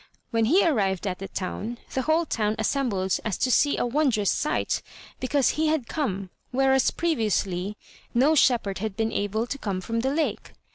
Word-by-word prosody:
When 225 -2 +2
he 345 - +4
arrived 200 - +1
at 185 -2 -2
the 195 - -5
town, 210 +6 -4 0.2
the 265 - 0
whole 315 +4 +2
town 215 -6 0
assembled 220 -5 0
as 215 -5 -2
to 255 - +1
see 285 +3 +3
a - - +1
wondrous 240 -6 +2
sight 300 - 0 0.4
because 270 +1 +2
he 315 +1 +1
had 310 -5 +1
come, 195 - -3 0.2
whereas 265 0 +3
previously 210 - -1 0.3
no 270 +6 +4
shepherd 235 -10 +3
had 215 -1 -4
been 225 0 0
able 210 +3 -1
to 280 +3 -5
come 195 -6 -2
from 230 +5 -2
the 265 +3 0
lake. 310 +2 -2
230 Hz, 180 wpm, -26 LUFS, 200-280 Hz, 0.4 s, he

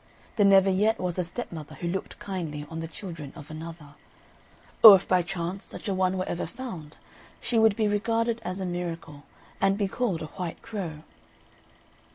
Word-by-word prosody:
There 205 -3 +5
never 195 -1 +6
yet 215 +4 +2
was 180 0 -2
a - - +2
stepmother 170 -5 -6
who 170 - -4
looked 190 +3 -4
kindly 160 -7 -5
on 165 - -4
the 165 - -4
children 165 -4 -8
of 145 +2 -10
another; 155 -2 -9 0.9
or 215 -3 +14
if 190 - -1
by 185 -1 +4
chance 180 +1 -4
such - - -8
a 200 - +1
one 185 0 +1
were 185 - -1
ever 170 - -3
found, 170 -8 -8 0.4
she 230 - +1
would 220 -2 +5
be 215 -1 +1
regarded 230 +2 0
as 185 +2 -4
a 190 - -2
miracle, 170 -4 -5 0.4
and 195 0 +3
be 205 -2 +1
called 195 -6 -1
a 155 - -9
white 180 -3 -5
crow. 170 -8 -5
185 Hz, 185 wpm, -27 LUFS, 165-200 Hz, 0.9 s, or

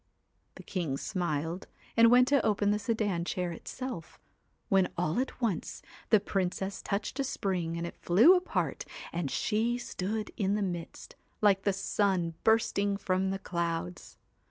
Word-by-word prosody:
The - - -11
king 165 -8 -2
smiled, 170 -2 -2 0.3
and 230 0 +7
went 250 +1 +6
to 280 -3 +3
open 205 -1 +2
the 210 - +1
sedan 205 -5 0
chair 180 0 -2
itself, 185 +1 -7 0.5
when 190 -2 +3
all 170 +3 0
at 265 - -3
once, 220 -9 -2 0.3
the 215 - +6
Princess 195 0 -2
touched 200 +7 -3
a - - +2
spring 180 -9 -2
and 170 - -3
it 170 - -7
flew 220 - +7
apart, 365 0 -1 0.3
and 170 -4 -2
she 230 - 0
stood 215 -2 -4
in 200 0 +1
the 210 - 0
midst, 175 -3 -6 0.2
like 200 -2 +3
the 200 - +4
sun 190 -3 0
bursting 210 -3 +2
from 190 -1 0
clouds. 170 0 -3
195 Hz, 150 wpm, -30 LUFS, 175-215 Hz, 0.5 s, and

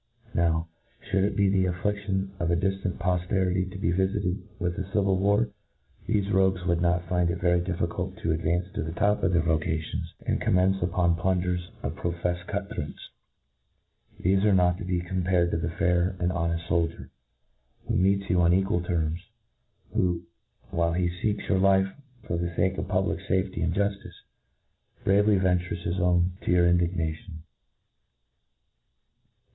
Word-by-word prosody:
Now, 80 -1 +1 0.4
fliould 95 -1 +1
it 105 0 -1
be 100 0 +3
the 95 -1 +2
affliaion 95 +1 -1
of 85 - 0
a 85 - +3
diftant 95 +1 -1
pofterity 90 +1 0
to 95 - -7
be 90 -3 0
vifited 95 0 0 0.2
with 90 -1 -2
a 95 0 -5
civil 100 -2 +2
war, 100 +4 +2 0.6
thefe 100 -2 +1
rogues 95 -2 +2
would 85 -2 +1
not 90 0 +1
find 90 -1 +1
it 85 +1 -2
very 90 0 +2
difficult 85 -1 -3
to 80 - -1
advance 85 +3 0
to 105 - -2
the 80 +1 -4
top 105 +4 +1
'of 95 - +2
their 85 -2 +2
vo 80 -2 +2
cations, 80 +2 -3
and - - 0
commence 95 +1 +3
open 85 0 +2
plunderers 90 0 -1
and 70 +3 -3
pro 85 - -2
feffed 90 +1 -3
cut 100 0 -4
throats. 75 0 -7 1.1
They 95 - +2
are 100 0 +3
not 90 0 +3
to 100 - -5
be 90 -1 0
compared 90 -1 +1
to - - 0
the 85 - -2
fair 90 +2 +1
and 90 +1 +1
honeft 85 -1 -1
foldier, 85 -1 -1 0.8
who - - 0
meets 100 +1 +2
you 90 0 +2
on 85 0 +4
equal 95 -2 +1
terms, 85 -2 -1 0.7
who, 90 -2 +1 0.5
while 85 0 +1
he 90 0 +1
feeks 105 +4 -2
your 95 - +2
life 95 0 +3 0.3
for 85 - -2
the 85 +1 -1
fake 95 +2 +1
of - - -3
public 95 -3 0
fafcty 95 -1 0
and 85 +1 0
juflice, 100 0 -2 0.8
bravely 100 +1 +4
ventures 90 -1 0
his 85 +2 -1
own 90 0 +3
to - - -5
your 90 -1 +5
indignation. 85 0 -1
90 Hz, 165 wpm, -27 LUFS, 85-95 Hz, 1.1 s, your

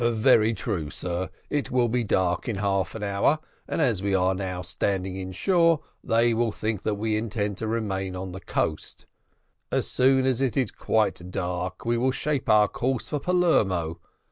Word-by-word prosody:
"Very 115 -1 +4
true, 90 -12 -3
sir. 90 +2 -3 0.2
It 145 -2 -1
will 125 -1 +2
be 120 +1 0
dark 95 +1 0
in 115 - -1
half 95 -2 -1
an 110 - -5
hour, 100 +9 +2 0.3
and - - -2
as 120 - +2
we 100 -1 +1
are 95 0 +2
now 90 -1 -4
standing 95 +2 -2
inshore, 165 - +2 0.2
they 115 +1 +3
will 115 0 +1
think 110 -1 -2
that 105 - -1
we 110 +1 -1
intend 105 -2 -2
to 110 - -3
remain 95 -4 -2
on 95 0 -5
the 95 +2 -8
coast. 75 - -3 0.7
As - - 0
soon 130 0 +3
as 130 -1 +1
it 135 -2 0
is 130 -6 +1
quite 100 -5 0
dark 90 0 -3
we 120 0 +1
will 130 +2 +2
shape 135 -1 -2
our 105 -1 +6
course 130 +2 -2
for 150 - -1
Palermo. 95 - +1
105 Hz, 180 wpm, -26 LUFS, 95-120 Hz, 0.7 s, our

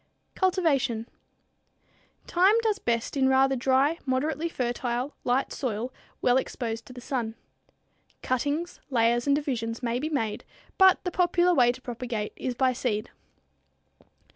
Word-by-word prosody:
Cultivation. 280 - +1 1.2
Thyme 375 +4 +4
does 430 -2 +1
best 230 - -1
in 265 -1 +3
a - - +3
rather 265 0 +4
dry, 270 +5 +2
moderately 300 +5 -1
fertile, 245 0 -2
light 255 +2 0
soil 245 -1 -3 0.3
well 245 0 +4
exposed 230 -3 -3
to 255 - -11
the 250 - -9
sun. 240 -3 -3 0.9
Cuttings, 290 +7 -1
layers 240 0 +2
and 280 - +4
divisions 240 -5 -3
may 235 0 0
be 305 +4 -2
made, 225 -9 -2 0.4
but 380 -1 +6
the 360 - -2
popular 355 0 +3
way 245 -6 +5
to 255 +1 -12
propagate 235 -3 -4
is 255 -2 -3
by 255 0 +2
seed. 230 -3 -2
260 Hz, 140 wpm, -27 LUFS, 240-295 Hz, 1.2 s, but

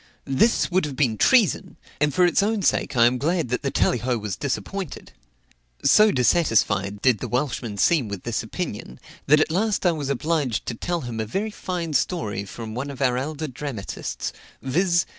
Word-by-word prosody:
This 160 - +2
would 185 -1 +2
have 145 -3 -5
been 125 -5 +1
treason; 230 - +3 0.2
and 150 0 +2
for 180 +6 +3
its 175 - +3
own 210 0 0
sake 135 - +1
I 115 - +6
am 125 +1 +2
glad 165 -1 0
that 125 - -1
the 140 - -1
Tallyho 125 -1 +1
was 105 -3 -4
disappointed." 180 +5 -4 0.7
So 210 +10 +6
dissatisfied 110 - +1
did 125 -5 +4
the - - -4
Welshman 125 -5 -2
seem 145 - +3
with 100 -3 -6
this 115 -1 -2
opinion, 110 - -6 0.3
that 150 +2 +6
at 155 - +1
last 200 +3 0
I 175 - +5
was 150 -4 -4
obliged 140 -3 -1
to - - -3
tell 175 +9 -3
him 120 -3 -5
a 110 - -1
very 205 - -2
fine 175 -5 -4
story 105 - -1
from 110 +2 -8
one 130 +5 -4
of 135 -2 -8
our 130 -3 +2
elder 150 +4 -3
dramatists, 130 -6 -5 0.3
viz. 170 +5 +1
140 Hz, 185 wpm, -23 LUFS, 120-175 Hz, 0.7 s, I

